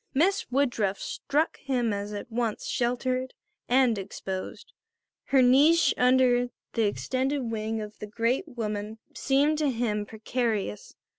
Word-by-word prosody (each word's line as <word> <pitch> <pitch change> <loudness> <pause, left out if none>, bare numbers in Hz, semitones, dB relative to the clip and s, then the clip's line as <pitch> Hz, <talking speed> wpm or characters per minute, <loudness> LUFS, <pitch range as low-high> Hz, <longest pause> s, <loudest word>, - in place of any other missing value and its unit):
Miss 385 +8 +2
Woodruff 240 -7 +1
struck 295 +3 -1
him 245 -5 -1
as 200 +1 -4
at 210 +3 -7
once 230 -2 -2
sheltered 255 +1 -1 0.3
and 245 -4 +3
exposed. 190 0 -6 0.5
Her 265 -2 +4
niche 295 +7 +5
under 250 -1 +3 0.2
the 225 -3 +2
extended 260 +3 -1
wing 220 0 -2
of 210 0 -8
the 210 - -6
great 230 +4 0
woman 215 -2 -4 0.2
seemed 285 +3 +2
to 300 -2 +2
him 220 -4 -1
precarious. 220 - -3
245 Hz, 130 wpm, -27 LUFS, 215-260 Hz, 0.5 s, niche